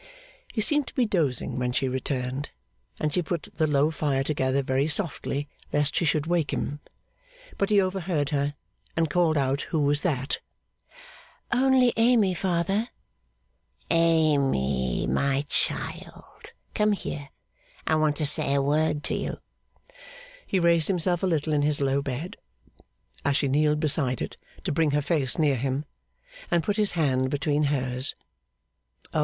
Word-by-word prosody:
He 220 Hz, -, -1 dB
seemed 295 Hz, +5 st, +2 dB
to -, -, -11 dB
be 255 Hz, -, +3 dB
dozing 150 Hz, -, -1 dB
when 125 Hz, -1 st, -1 dB
she 135 Hz, -, 0 dB
returned, 130 Hz, +1 st, -3 dB, 0.5 s
and 150 Hz, -1 st, -1 dB
she 180 Hz, -, +2 dB
put 170 Hz, -1 st, -4 dB
the 155 Hz, -, +1 dB
low 145 Hz, +1 st, +2 dB
fire 145 Hz, -3 st, 0 dB
together 135 Hz, -1 st, 0 dB
very 135 Hz, +2 st, +1 dB
softly 150 Hz, -4 st, -1 dB, 0.2 s
lest 145 Hz, 0 st, +1 dB
she 170 Hz, -, +1 dB
should 155 Hz, -1 st, +1 dB
awake 170 Hz, -3 st, 0 dB
him. 145 Hz, +1 st, -3 dB, 0.8 s
But 200 Hz, -, +1 dB
he 210 Hz, -1 st, +5 dB
overheard 185 Hz, -6 st, -1 dB
her, 145 Hz, 0 st, 0 dB, 0.4 s
and 165 Hz, -2 st, +1 dB
called 165 Hz, -2 st, +2 dB
out 135 Hz, 0 st, +1 dB
who 160 Hz, -, 0 dB
was 145 Hz, 0 st, +2 dB
that? 135 Hz, -6 st, -1 dB, 1.1 s
'Only 255 Hz, 0 st, +4 dB
Amy, 225 Hz, -5 st, +4 dB
father.' 185 Hz, +5 st, 0 dB, 1.0 s
'Amy, 140 Hz, -, +2 dB
my 135 Hz, -, 0 dB
child, -, -, -2 dB, 0.2 s
come 210 Hz, 0 st, +2 dB
here. 145 Hz, -7 st, -5 dB, 0.6 s
I -, -, +1 dB
want 155 Hz, -1 st, +2 dB
to 150 Hz, -, 0 dB
say 145 Hz, -1 st, +3 dB
a -, -, +3 dB
word 150 Hz, +1 st, +1 dB
to -, -, -2 dB
you.' -, -, -3 dB, 1.1 s
He 190 Hz, -, +1 dB
raised 170 Hz, -2 st, +3 dB
himself 175 Hz, -2 st, +1 dB
a 190 Hz, -, +1 dB
little 155 Hz, -3 st, 0 dB
in 145 Hz, -, +2 dB
his 150 Hz, 0 st, +1 dB
low 140 Hz, 0 st, +1 dB
bed, 140 Hz, +6 st, -5 dB, 0.9 s
as 140 Hz, -1 st, +2 dB
she 140 Hz, -, +1 dB
kneeled 150 Hz, +2 st, +2 dB
beside 140 Hz, -5 st, 0 dB
it -, -, -5 dB, 0.3 s
to -, -, -1 dB
bring 155 Hz, +1 st, +2 dB
her -, -, +1 dB
face 140 Hz, -5 st, +1 dB
near 145 Hz, -5 st, +2 dB
him; 135 Hz, +4 st, -2 dB, 0.6 s
and 170 Hz, -1 st, +2 dB
put 205 Hz, 0 st, -1 dB
his 210 Hz, -2 st, +1 dB
hand 130 Hz, -6 st, +1 dB
between 145 Hz, +1 st, 0 dB
hers. 130 Hz, -2 st, 0 dB, 1.0 s
O! -, -, +1 dB
150 Hz, 155 wpm, -26 LUFS, 140-170 Hz, 1.1 s, he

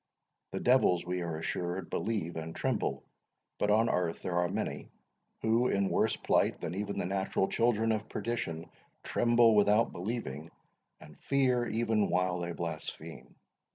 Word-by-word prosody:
The -, -, -3 dB
devils, 120 Hz, -9 st, +3 dB
we 90 Hz, 0 st, -2 dB
are 85 Hz, -2 st, -3 dB
assured, 85 Hz, +2 st, -3 dB
believe 100 Hz, -7 st, -2 dB
and 80 Hz, 0 st, -5 dB
tremble; -, -, -1 dB, 0.6 s
but 105 Hz, -, +1 dB
on 110 Hz, +2 st, +4 dB
earth 90 Hz, -5 st, -1 dB
there 90 Hz, -1 st, 0 dB
are 90 Hz, 0 st, +1 dB
many, -, -, -3 dB, 0.5 s
who, 115 Hz, +3 st, +3 dB
in 100 Hz, -4 st, +1 dB
worse -, -, +2 dB
plight -, -, +1 dB
than 80 Hz, -, -4 dB
even 100 Hz, +1 st, -3 dB
the -, -, -1 dB
natural 95 Hz, +1 st, 0 dB
children 115 Hz, -1 st, +2 dB
of 110 Hz, 0 st, -2 dB
perdition, 85 Hz, -9 st, -3 dB, 0.4 s
tremble 120 Hz, -1 st, +4 dB
without 105 Hz, +2 st, +4 dB
believing, 85 Hz, -, -5 dB, 0.5 s
and 75 Hz, -1 st, -15 dB
fear 130 Hz, -3 st, +1 dB
even 110 Hz, -2 st, +1 dB
while 90 Hz, 0 st, +1 dB
they 85 Hz, 0 st, -3 dB
blaspheme. 80 Hz, -1 st, -6 dB
95 Hz, 150 wpm, -31 LUFS, 85-115 Hz, 0.6 s, on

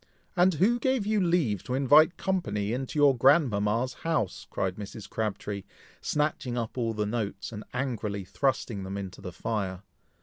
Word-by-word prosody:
"And 180 Hz, 0 st, +4 dB
who 225 Hz, +9 st, +3 dB
gave 260 Hz, -3 st, +1 dB
you 215 Hz, -1 st, +2 dB
leave 165 Hz, -, +2 dB
to 125 Hz, -, -1 dB
invite 150 Hz, +5 st, +5 dB
company 105 Hz, -, -1 dB
into 130 Hz, +4 st, -3 dB
your 145 Hz, -2 st, +6 dB
grandmama's 120 Hz, -4 st, +3 dB
house?" 155 Hz, -, -1 dB
cried 95 Hz, -1 st, -2 dB
Mrs. 105 Hz, 0 st, -7 dB
Crabtree, 105 Hz, -2 st, -3 dB, 0.4 s
snatching 150 Hz, -4 st, -1 dB
up 115 Hz, -2 st, -3 dB
all 115 Hz, -3 st, -1 dB
the 105 Hz, 0 st, 0 dB
notes, 105 Hz, -2 st, -3 dB
and 105 Hz, -1 st, -6 dB
angrily 110 Hz, -6 st, -2 dB
thrusting 120 Hz, -3 st, -1 dB
them 95 Hz, +1 st, -5 dB
into 95 Hz, -2 st, -6 dB
the 90 Hz, -2 st, -6 dB
fire. 95 Hz, -2 st, -3 dB
120 Hz, 160 wpm, -28 LUFS, 100-150 Hz, 0.4 s, your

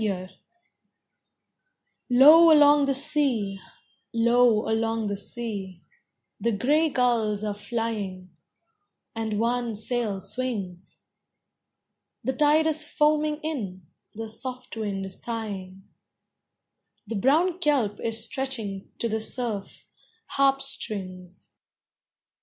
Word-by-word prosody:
TIDALS 185 Hz, -3 st, -3 dB, 1.8 s
Low 305 Hz, +7 st, +8 dB
along 290 Hz, -1 st, +6 dB
the 275 Hz, -, +1 dB
sea, 260 Hz, -9 st, 0 dB, 0.5 s
low 235 Hz, -1 st, +3 dB
along 225 Hz, 0 st, -1 dB
the 200 Hz, -1 st, -2 dB
sea, 200 Hz, -4 st, -6 dB, 0.6 s
The 235 Hz, -, 0 dB
gray 295 Hz, +9 st, +2 dB
gulls 230 Hz, -6 st, 0 dB
are 210 Hz, -1 st, -2 dB
flying, 205 Hz, -3 st, -5 dB, 0.8 s
and 220 Hz, -2 st, -3 dB
one 235 Hz, 0 st, -1 dB
sail 220 Hz, -2 st, -2 dB
swings; 195 Hz, -4 st, -5 dB, 1.3 s
The 265 Hz, -, -1 dB
tide 300 Hz, +3 st, +3 dB
is 310 Hz, -1 st, +2 dB
foaming 300 Hz, 0 st, +1 dB
in; 200 Hz, -, -5 dB, 0.3 s
the 225 Hz, +1 st, -5 dB
soft 250 Hz, +3 st, -5 dB
wind 195 Hz, -3 st, -4 dB
sighing; 195 Hz, -3 st, -6 dB, 1.2 s
The 225 Hz, +2 st, -5 dB
brown 320 Hz, -, +2 dB
kelp 265 Hz, -, 0 dB
is 225 Hz, 0 st, +1 dB
stretching, 225 Hz, -6 st, -4 dB
to 235 Hz, -, -2 dB
the 220 Hz, 0 st, -2 dB
surf, 220 Hz, -3 st, -1 dB, 0.4 s
harp 275 Hz, 0 st, +2 dB
strings. 185 Hz, -8 st, -2 dB
230 Hz, 100 wpm, -25 LUFS, 205-270 Hz, 1.8 s, Low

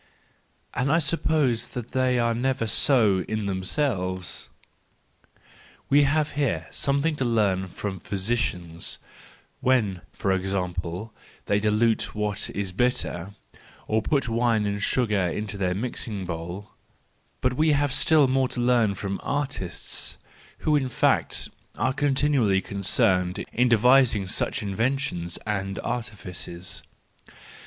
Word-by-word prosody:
— -, -, -41 dB
and 130 Hz, +3 st, 0 dB
I 160 Hz, -, +5 dB
suppose 150 Hz, -6 st, +1 dB
they 125 Hz, +1 st, -1 dB
are 115 Hz, -1 st, +2 dB
never 130 Hz, 0 st, 0 dB
so 110 Hz, -3 st, +4 dB
in 110 Hz, -1 st, -2 dB
themselves! 95 Hz, -, -1 dB, 1.4 s
We 145 Hz, +1 st, +6 dB
have 155 Hz, +2 st, +1 dB
here 125 Hz, -, -1 dB
something 140 Hz, +3 st, 0 dB
to 135 Hz, -, 0 dB
learn 105 Hz, -6 st, +1 dB
from 95 Hz, +1 st, -5 dB
physicians, 95 Hz, -5 st, -2 dB, 0.6 s
when, 110 Hz, -9 st, +1 dB
for 95 Hz, -, -1 dB
example, 90 Hz, +1 st, -3 dB, 0.3 s
they 100 Hz, -, +2 dB
dilute 110 Hz, +2 st, +1 dB
what 105 Hz, -1 st, -1 dB
is 100 Hz, -2 st, -3 dB
bitter, 100 Hz, -4 st, -1 dB, 0.5 s
or 110 Hz, +1 st, +2 dB
put 140 Hz, +2 st, 0 dB
wine 115 Hz, -2 st, +2 dB
and 100 Hz, 0 st, -2 dB
sugar 105 Hz, -5 st, +1 dB
into 105 Hz, +4 st, -4 dB
their 90 Hz, -2 st, 0 dB
mixing 105 Hz, -3 st, -3 dB
bowl; 90 Hz, +4 st, -6 dB, 0.7 s
but 130 Hz, 0 st, +1 dB
we 155 Hz, +3 st, +3 dB
have, 145 Hz, -1 st, +1 dB
still 155 Hz, -4 st, +5 dB
more 130 Hz, 0 st, +2 dB
to 125 Hz, -, -5 dB
learn 120 Hz, -4 st, +3 dB
from 100 Hz, +1 st, -3 dB
artists, 135 Hz, -, -3 dB, 0.5 s
who 155 Hz, -, +4 dB
in 135 Hz, -3 st, +1 dB
fact, 120 Hz, -, +1 dB, 0.3 s
are 130 Hz, +4 st, 0 dB
continually 140 Hz, -7 st, +2 dB
concerned 95 Hz, -2 st, +1 dB
in 125 Hz, +1 st, +3 dB
devising 120 Hz, -2 st, +5 dB
such 95 Hz, -, -1 dB
in¬ 100 Hz, -2 st, -3 dB
ventions 115 Hz, -9 st, -1 dB
and 100 Hz, -2 st, -2 dB
artifices. 95 Hz, -6 st, -5 dB
110 Hz, 125 wpm, -25 LUFS, 95-130 Hz, 1.4 s, We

